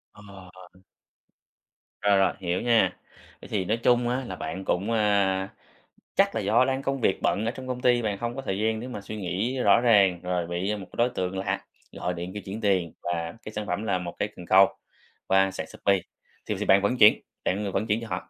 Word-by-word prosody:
Ồ! 95 -3 -14 1.2
Rồi, 100 -1 +4
rồi, 95 0 +3
hiểu 90 -1 -1
nha, 120 -2 +3 0.4
vậy - - -11
thì 95 -4 -1
nói 110 +5 0
chung 120 -1 +3
á, 130 +2 -1
là - - -5
bạn 95 +4 -6
cũng, 100 +6 0
a, 100 -3 +2 0.7
chắc - - +3
là - - 0
do 130 - +3
đang 135 0 -1
công 135 -1 -2
việc 95 - +2
bận 105 - +1
ở 115 - 0
trong 130 +1 -9
công 125 -1 -4
ty, 120 -1 +3
bạn 105 -3 -2
không 120 +2 -4
có 135 - -4
thời 95 -7 -3
gian 110 0 0
để 125 - -6
mà 115 -5 -6
suy 110 +2 -7
nghĩ 105 +7 -2
rõ 120 - +5
ràng, 100 -7 +4
rồi 90 -1 -1
bị 90 +5 -2
một 100 -2 -7
cái 90 - -16
đối 120 +1 +3
tượng 95 -5 -3
lạ 95 - -2 0.3
gọi 90 - -3
điện 90 +1 -6
kêu 105 - -5
chuyển 100 +4 -6
tiền, 95 -6 +1
và 85 -1 -3
cái 110 - -7
sản 105 -1 -4
phẩm 90 +4 -2
là 100 -4 0
1 85 -1 -6
cái 105 - 0
cần 90 - -10
câu, 95 +2 +6 0.6
qua 95 0 +3
sàn - - -5
Shopee, 100 -1 +1 0.5
thì - - -2
thì - - -2
bạn 95 +1 +5
vẫn 100 +5 0
chuyển, 105 -3 +6 0.2
bạn, 100 +3 0
ờ, 100 - -3
vẫn 105 +4 -1
chuyển 110 +2 +1
cho 115 - -7
họ. 90 -4 -5
100 Hz, 235 wpm, -26 LUFS, 95-115 Hz, 1.2 s, câu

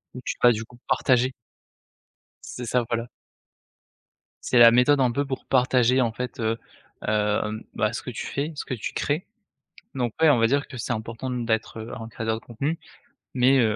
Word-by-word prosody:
Où 125 - -7
tu - - -2
vas, 120 - +7
du 110 0 -4
coup, 120 +1 -18
partager. 130 0 +2 1.2
C'est 125 - -5
ça, 120 +1 +1
voilà. 115 0 -1 1.4
C'est 125 - +3
la 115 0 +10
méthode, 125 +4 +4
un 130 -2 +4
peu, 140 +3 0
pour 135 -1 -5
partager, 125 0 +3
en 115 -2 +1
fait, 125 +1 -5
heu, 110 +1 0 0.5
hem, 105 0 0
bah, 110 +1 +1
ce - - -4
que - - -7
tu - - -5
fais, 145 +3 -2
ce - - -4
que - - -4
tu 115 - -4
crées, 150 +5 -1 0.7
donc, 120 -3 -1
ouais, 160 - +7
on 140 - +5
va 115 - +4
dire 140 +3 +1
que 130 - -10
c'est 120 +1 -2
important 115 +3 -5
d'être 115 -2 -1
heu, 110 - -8
un 115 - -7
créateur 110 0 -3
de - - -25
contenu 140 +8 -3 0.5
mais 130 +1 +4
heu, 110 -3 +3
120 Hz, 195 wpm, -25 LUFS, 115-130 Hz, 1.4 s, la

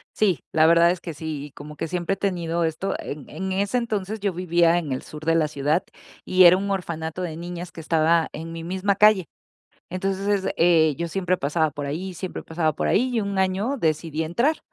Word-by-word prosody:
Sí, 195 -6 +2
la 160 0 +4
verdad 170 +1 +6
es 180 - -3
que 170 -2 -7
sí. 150 -1 -5
Y 145 - -12
como 150 +1 -10
que 165 - -4
siempre 180 +2 -1
he - - -4
tenido 170 -3 -1
esto, 160 +4 -1
en 145 -1 -7
en 190 0 -4
ese 200 +5 0
entonces 215 -3 -2
yo 200 -2 -1
vivía 170 -1 +3
en 155 -5 -3
el 130 - -2
sur 155 0 -10
de 165 0 +3
la 155 -2 +3
ciudad 150 +4 0 0.4
y 185 0 +5
era 175 +2 +8
un 200 +1 -3
orfanato 170 -2 -3
de 165 -3 -4
niñas 175 +1 -6
que 165 - -9
estaba 165 +1 +2
en 165 +2 -6
mi 165 0 -6
misma 190 +3 0
calle. 205 -4 +5 0.6
Entonces, 195 +1 -1
eh, 160 -3 +4
yo 170 0 -2
siempre 185 0 0
pasaba 155 +2 +1
por 145 -1 -5
ahí, 180 +6 -4
siempre 185 +1 -6
pasaba 160 -2 -1
por - - -1
ahí 255 +4 +2
y - - +2
un 200 -1 -2
año 195 +8 0
decidí 160 -2 -1
entrar. 235 - +1
170 Hz, 215 wpm, -24 LUFS, 160-190 Hz, 0.6 s, era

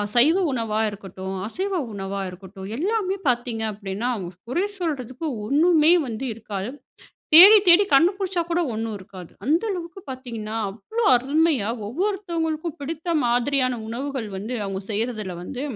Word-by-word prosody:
சைவ 290 +9 +5
உணவா 225 -4 -1
இருக்கட்டும், 190 -1 -7
அசைவ 380 - -3 0.2
உணவா 195 0 -4
இருக்கட்டும், 190 +1 -10
எல்லாமே 390 +2 0
பார்த்தீங்க 240 -2 0
அப்டின்னா, 200 +3 -4
அவுங்க 185 -5 -6 0.2
குறை 350 +9 +1
சொல்றதுக்கு 290 -3 -3 0.2
ஒண்ணுமே 315 +4 +4 0.2
வந்து 230 +2 -4
இருக்காது. 210 0 -5 0.6
தேடி 385 +7 +11
தேடி 350 +4 +8
கண்டு 330 +7 +6
புடிச்சா 380 -3 -1
கூட 345 +1 +1
ஒண்ணும் 220 -1 -3
இருக்காது. 185 -2 -11
அந்த 320 +5 +3
அளவுக்கு 355 0 -6
பாத்தீங்கன்னா, 230 -4 -6
அவ்ளோ 230 - -4
அருமையா 280 -3 +1 0.2
ஒவ்வொருத்தங்களுக்கும் 335 - -2
பிடித்த 330 +3 -3
மாதிரியான 250 +1 +1
உணவுகள் 255 0 -4
வந்து, 215 +6 -5
அவுங்க 195 0 -4
செய்யறதுல 215 -4 -2
வந்து, 255 +7 -6
255 Hz, 135 wpm, -23 LUFS, 215-330 Hz, 0.6 s, தேடி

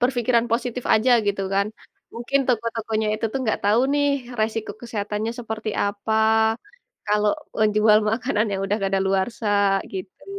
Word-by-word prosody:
berpikiran 245 -1 +2
positif 245 +1 -2
aja 220 +4 +2 0.2
gitu 200 -1 0
kan. 200 +1 +2 0.5
Mungkin 240 +4 0
toko-tokonya 225 -2 -1
itu 220 - -4
tuh - - -1
enggak 220 -4 0
tau 210 +3 +4
nih 290 0 +2 0.3
resiko 220 0 -1
kesehatannya 215 -1 -3
seperti 220 -2 -4
apa. 205 +2 -2 0.9
Kalau 210 0 +2 0.3
menjual 215 0 +4
makanan 225 -1 0
yang 195 - -2
udah 205 +3 0
kadaluarsa, 195 +3 0 0.4
gitu. 185 0 -8
220 Hz, 135 wpm, -23 LUFS, 205-235 Hz, 0.9 s, tau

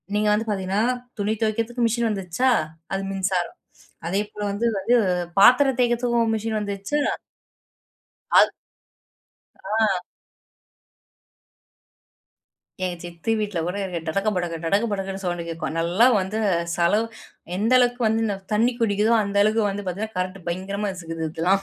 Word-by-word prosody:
நீங்க 210 0 +2
வந்து 220 +2 0
பார்த்தீங்கன்னா, 195 +1 0 0.4
துணி 205 +2 0
துவைக்கிறதுக்கு 230 +2 0
மிஷின் 230 0 +1
வந்துருச்சா, 195 +5 0 0.4
அது 195 - -1
மின்சாரம். 190 -2 -1 0.5
அதேபோல 210 +3 -2
வந்து 210 +4 -2
வந்து 225 +6 +2 0.4
பாத்திரம் 255 +4 +6
தேய்க்கிறதுக்கும் 240 -1 +2
மிஷின் 220 0 -2
வந்துருச்சா. 205 +8 -2 1.4
அது - - +6 1.1
ஆ. 200 -3 +1 2.8
எங்க 180 -1 -1
சித்தி 175 +6 -3
வீட்ல 205 -4 -2
கூட 180 +3 -3
இருக்கு. 180 -3 -3
டடக 195 +6 0
படக 175 -2 -2
டடக 200 +7 +2
படக்குன்னு 195 -1 -3
சவுண்டு 175 -1 -2
கேட்கும். 165 0 -4
நல்லா 175 +8 +3
வந்து 195 +4 -3 0.4
செலவு 190 +6 +3 0.5
எந்த 220 +5 +1
அளவுக்கு 245 0 +2
வந்து 220 +1 +2
இந்த 205 -3 -1 0.2
தண்ணி 230 +4 +3
குடிக்குதோ, 215 +1 +2
அந்த 200 0 -4
அளவுக்கு 215 +1 +2
வந்து 205 +1 -4
பார்த்தீங்கன்னா 205 +4 -4
கரண்ட் 185 +1 -2
பயங்கரமா 195 +3 -2
இசுக்குது 165 -2 -6
இதெல்லாம். 185 +5 +1
205 Hz, 130 wpm, -23 LUFS, 185-225 Hz, 2.8 s, பாத்திரம்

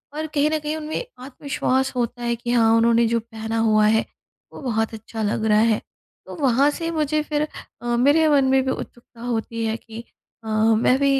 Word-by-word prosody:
और 310 +1 -3
कहीं 300 -1 +1
न 315 - 0
कहीं 300 +1 -3
उनमें 315 +9 -4 0.2
आत्मविश्वास 265 -1 -1
होता 245 0 -2
है 235 0 0
कि 240 +1 -4
हाँ 230 -2 +4
उन्होंने 230 +1 +4
जो 230 +1 +1
पहना 225 0 -5
हुआ 215 -1 +4
है, 220 +1 +2 0.5
वो - - -10
बहुत 225 -4 -1
अच्छा 220 +1 -7
लग 215 +1 -1
रहा 210 -1 +4
है। 220 -1 +2 0.4
तो - - -9
वहाँ 270 +1 +4
से 330 +2 -4
मुझे 305 -1 0
फिर 300 0 -1 0.3
अ, 240 0 -1
मेरे 290 +6 +4
मन 280 -2 +4
में 265 0 +4
भी 260 - 0
उत्सुकता 240 -2 -9
होती 230 -1 -3
है 220 0 -1
कि 230 0 -10 0.4
अ, - - -10
मैं 220 +3 +3
भी 275 -1 +3
240 Hz, 205 wpm, -22 LUFS, 225-285 Hz, 0.5 s, हाँ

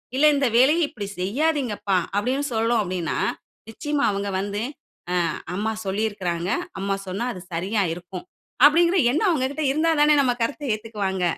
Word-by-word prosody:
இல்ல 280 +3 +4
இந்த 275 -2 +2
வேலைய 300 +6 +5
இப்டி 205 -3 -6
செய்யாதீங்கப்பா" 230 - 0 0.2
அப்டின்னு 260 +7 0
சொல்றோம் 225 0 +2
அப்டின்னா, 180 -4 -3 0.5
நிச்சயமா 290 +5 -1
அவங்க 200 0 -3
வந்து, 205 +2 -3 0.7
அ - - -4 0.2
அம்மா 220 +3 -1
சொல்லியிருக்காங்க, 190 -4 -2 0.3
அம்மா 195 0 -1
சொன்னா 200 +6 -2
அது 180 - -9
சரியா 195 +5 0
இருக்கும். 180 +1 -9 0.4
அப்டிங்கற 340 +5 +5
எண்ணம் 370 +8 +2
அவங்ககிட்ட 285 +1 -1
இருந்தாதானே 305 0 +3
நம்ம 250 -2 +2
கருத்த 285 +5 -3
ஏத்துக்குவாங்க. 205 -4 -3
220 Hz, 135 wpm, -23 LUFS, 195-285 Hz, 0.7 s, வேலைய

